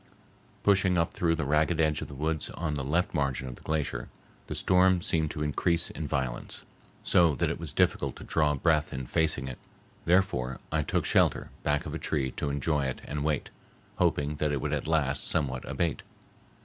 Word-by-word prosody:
Pushing 95 Hz, -2 st, +4 dB
up 85 Hz, 0 st, +1 dB
through 85 Hz, -1 st, +1 dB
the 80 Hz, -2 st, -2 dB
ragged 75 Hz, +3 st, +2 dB
edge 75 Hz, -2 st, +2 dB
of -, -, -5 dB
the 70 Hz, -, -10 dB
woods 80 Hz, +2 st, -1 dB
on 80 Hz, -3 st, -1 dB
the 70 Hz, -2 st, -2 dB
left 80 Hz, +6 st, 0 dB
margin 70 Hz, -4 st, -1 dB
of 65 Hz, -, -5 dB
the -, -, -16 dB
glacier, 75 Hz, -3 st, -2 dB, 0.4 s
the -, -, -4 dB
storm 95 Hz, 0 st, +4 dB
seemed 80 Hz, -2 st, +1 dB
to 75 Hz, -, -3 dB
increase 85 Hz, +3 st, +1 dB
in 75 Hz, -1 st, -5 dB
violence, 65 Hz, -4 st, -3 dB, 0.4 s
so 85 Hz, -4 st, +4 dB
that -, -, 0 dB
it -, -, -4 dB
was -, -, -2 dB
difficult -, -, +1 dB
to -, -, -10 dB
draw 75 Hz, -2 st, +2 dB
breath 75 Hz, +1 st, +2 dB
in 65 Hz, -1 st, -4 dB
facing 75 Hz, -1 st, +1 dB
it; 65 Hz, -, -7 dB, 0.5 s
therefore 85 Hz, -9 st, +2 dB
I 80 Hz, 0 st, +2 dB
took 70 Hz, -, -1 dB
shelter -, -, +2 dB
back 75 Hz, 0 st, 0 dB
of -, -, -5 dB
a -, -, -3 dB
tree 65 Hz, -4 st, -1 dB
to 70 Hz, -, -3 dB
enjoy 70 Hz, 0 st, 0 dB
it 65 Hz, -, -3 dB
and 75 Hz, 0 st, -3 dB
wait, 75 Hz, -2 st, -1 dB, 0.5 s
hoping 75 Hz, +1 st, +1 dB
that 75 Hz, 0 st, 0 dB
it 70 Hz, -, 0 dB
would -, -, -2 dB
at -, -, -2 dB
last 70 Hz, -4 st, +1 dB
somewhat 65 Hz, -5 st, -1 dB
abate. 75 Hz, +2 st, -1 dB
75 Hz, 200 wpm, -29 LUFS, 70-80 Hz, 0.5 s, Pushing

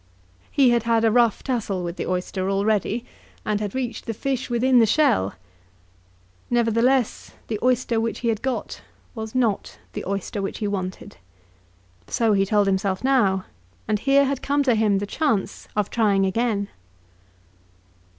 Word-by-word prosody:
He 265 Hz, -3 st, +4 dB
had 235 Hz, -1 st, +3 dB
had 230 Hz, 0 st, +2 dB
a 225 Hz, -, +4 dB
rough 235 Hz, -2 st, +3 dB
tussle 215 Hz, -8 st, -2 dB
with 170 Hz, 0 st, -4 dB
the -, -, -4 dB
oyster 185 Hz, +1 st, -2 dB
already, 210 Hz, +3 st, 0 dB, 0.4 s
and 210 Hz, -1 st, 0 dB
had 205 Hz, 0 st, -4 dB
reached 250 Hz, -2 st, -4 dB
the 225 Hz, -, -3 dB
fish 265 Hz, +2 st, -2 dB
within 245 Hz, +1 st, +3 dB
the 225 Hz, -, +5 dB
shell. 200 Hz, -, +2 dB, 1.1 s
Nevertheless, 240 Hz, +1 st, +1 dB, 0.2 s
the 215 Hz, -2 st, -2 dB
oyster 245 Hz, -2 st, +1 dB
which 230 Hz, 0 st, -3 dB
he 235 Hz, -, 0 dB
had 220 Hz, -2 st, -1 dB
got 265 Hz, -1 st, -3 dB, 0.3 s
was 220 Hz, 0 st, -7 dB
not 230 Hz, -6 st, 0 dB, 0.2 s
the -, -, -5 dB
oyster 200 Hz, +1 st, -3 dB
which 195 Hz, -, -4 dB
he 210 Hz, -, -2 dB
wanted. 185 Hz, -2 st, -5 dB, 0.9 s
So 225 Hz, -2 st, +1 dB
he 195 Hz, -1 st, +2 dB
told 205 Hz, 0 st, +3 dB
himself 190 Hz, 0 st, 0 dB
now, 205 Hz, -9 st, +2 dB, 0.4 s
and 210 Hz, -1 st, +1 dB
here 275 Hz, +3 st, +4 dB
had 275 Hz, -1 st, -2 dB
come 285 Hz, +1 st, +1 dB
to 255 Hz, -3 st, +3 dB
him 215 Hz, -2 st, +2 dB
the 200 Hz, -, -2 dB
chance 225 Hz, -4 st, -1 dB
of 210 Hz, -2 st, 0 dB
trying 205 Hz, -4 st, +2 dB
again. 200 Hz, 0 st, 0 dB
220 Hz, 160 wpm, -23 LUFS, 200-245 Hz, 1.1 s, the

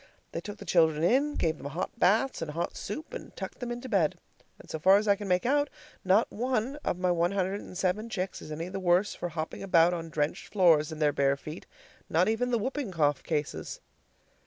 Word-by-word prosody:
They -, -, -4 dB
took 205 Hz, 0 st, -7 dB
the -, -, -10 dB
children 160 Hz, -3 st, +3 dB
in, 275 Hz, +10 st, +3 dB
gave 160 Hz, -2 st, 0 dB
them 140 Hz, -, -6 dB
hot 165 Hz, +10 st, -4 dB
baths 215 Hz, +7 st, +3 dB
and 165 Hz, -, -3 dB
hot 165 Hz, +3 st, -3 dB
soup, 295 Hz, +10 st, -6 dB
and -, -, -8 dB
tucked -, -, -7 dB
them 245 Hz, -, -4 dB
into 240 Hz, +2 st, -5 dB
bed. 185 Hz, -6 st, +1 dB, 0.4 s
And -, -, -15 dB
so 160 Hz, -, -5 dB
far 190 Hz, +5 st, +6 dB
as 210 Hz, +1 st, -1 dB
I 200 Hz, -, +5 dB
can 205 Hz, 0 st, -7 dB
make 180 Hz, +2 st, +1 dB
out, 285 Hz, +3 st, +2 dB, 0.3 s
not 190 Hz, +4 st, +3 dB
one 250 Hz, +3 st, -1 dB
of 295 Hz, -, -2 dB
my 180 Hz, 0 st, +1 dB
one 175 Hz, +2 st, +1 dB
hundred 195 Hz, +1 st, -1 dB
and 185 Hz, -, -9 dB
seven 195 Hz, +5 st, 0 dB
chicks 185 Hz, -3 st, -3 dB
is 155 Hz, -, -9 dB
any 160 Hz, +3 st, -4 dB
the 190 Hz, +1 st, -5 dB
worse 180 Hz, +2 st, +2 dB
for 175 Hz, -, -4 dB
hopping 160 Hz, -1 st, -5 dB
about 175 Hz, -2 st, +4 dB
on 165 Hz, -1 st, -4 dB
drenched 150 Hz, -1 st, -2 dB
floors 165 Hz, -6 st, +4 dB
in 155 Hz, -, -6 dB
their 150 Hz, -1 st, +2 dB
bare 140 Hz, 0 st, +2 dB
feet, 155 Hz, +4 st, -9 dB, 0.4 s
not 170 Hz, +3 st, +3 dB
even 225 Hz, +3 st, +1 dB
the 240 Hz, -, +2 dB
whooping 260 Hz, +2 st, -2 dB
cough 145 Hz, -5 st, +1 dB
cases. 150 Hz, -3 st, -3 dB
185 Hz, 225 wpm, -29 LUFS, 160-215 Hz, 0.4 s, far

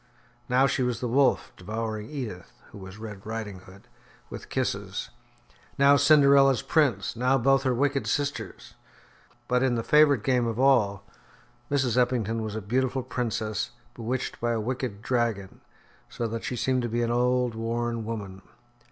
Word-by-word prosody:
Now 130 Hz, +2 st, +4 dB
she 135 Hz, -, 0 dB
was 125 Hz, -2 st, -1 dB
the 125 Hz, -, -2 dB
wolf, 130 Hz, +3 st, +2 dB
devouring 110 Hz, +2 st, -5 dB
Edith, 115 Hz, -, -6 dB, 0.2 s
who -, -, -11 dB
was 95 Hz, +1 st, -10 dB
Red 105 Hz, -3 st, -9 dB
Riding 110 Hz, -3 st, -5 dB
Hood, 95 Hz, +1 st, -16 dB, 0.4 s
with -, -, -8 dB
kisses. -, -, -3 dB, 0.7 s
Now 140 Hz, +1 st, +6 dB
Cinderella's 140 Hz, -3 st, +5 dB
prince, 120 Hz, -, +1 dB
now 125 Hz, +3 st, +2 dB
both 135 Hz, +2 st, +3 dB
her 130 Hz, -2 st, +1 dB
wicked 140 Hz, +2 st, 0 dB
sisters. 145 Hz, -1 st, -3 dB, 0.7 s
But 125 Hz, 0 st, +2 dB
in 130 Hz, -2 st, +2 dB
the 115 Hz, -, -2 dB
favourite 145 Hz, -5 st, +4 dB
game 125 Hz, -2 st, +2 dB
of 115 Hz, -1 st, -3 dB
all, 110 Hz, -8 st, +3 dB, 0.7 s
Mrs. 130 Hz, -4 st, +1 dB
Eppington 120 Hz, -3 st, +1 dB
was 110 Hz, -1 st, -4 dB
a 110 Hz, -, -4 dB
beautiful 130 Hz, +4 st, 0 dB
princess, 110 Hz, -4 st, -3 dB, 0.2 s
bewitched 120 Hz, +2 st, -4 dB
by 120 Hz, 0 st, +1 dB
a 115 Hz, -, -1 dB
wicked 115 Hz, -2 st, -4 dB
dragon, 115 Hz, -6 st, -2 dB, 0.5 s
so 120 Hz, -, -4 dB
that 115 Hz, +1 st, -5 dB
she 125 Hz, -, -3 dB
seemed 130 Hz, +2 st, 0 dB
to 120 Hz, -, -3 dB
be 120 Hz, +1 st, 0 dB
an 115 Hz, -, 0 dB
old, 125 Hz, 0 st, +1 dB
worn 115 Hz, +1 st, -2 dB
woman. 100 Hz, -4 st, -6 dB
120 Hz, 160 wpm, -26 LUFS, 110-130 Hz, 0.7 s, Now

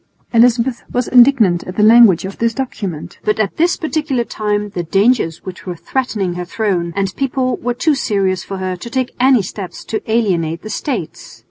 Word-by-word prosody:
Elizabeth 235 Hz, +1 st, +3 dB
was 245 Hz, -1 st, -1 dB
indignant 240 Hz, -9 st, +5 dB
at 185 Hz, -, -7 dB
the 210 Hz, -, +3 dB
language 220 Hz, -5 st, +6 dB
of 195 Hz, -, -8 dB
this 230 Hz, 0 st, 0 dB
document, 200 Hz, -, -5 dB
but 210 Hz, 0 st, 0 dB
at 210 Hz, -3 st, -1 dB
this 345 Hz, +2 st, +2 dB
particular 305 Hz, -6 st, -1 dB
time 210 Hz, -2 st, -2 dB
the 185 Hz, -3 st, -4 dB
dangers 195 Hz, -1 st, +1 dB
which 185 Hz, 0 st, -9 dB
were 180 Hz, -, -3 dB
threatening 210 Hz, -3 st, -2 dB
her 180 Hz, 0 st, -4 dB
throne 175 Hz, -3 st, -2 dB
and 195 Hz, -1 st, -1 dB
people 260 Hz, -1 st, -1 dB
were 245 Hz, 0 st, -3 dB
too 310 Hz, +5 st, +2 dB
serious 195 Hz, -8 st, 0 dB
for 195 Hz, -, -6 dB
her 185 Hz, -1 st, -3 dB
to 180 Hz, +7 st, -9 dB
take 260 Hz, 0 st, -2 dB
any 255 Hz, -4 st, +4 dB
steps 185 Hz, 0 st, -8 dB
to 220 Hz, -, -3 dB
alienate 175 Hz, -8 st, 0 dB
the 215 Hz, -, -6 dB
States. 230 Hz, -, -5 dB
215 Hz, 190 wpm, -17 LUFS, 185-250 Hz, -, language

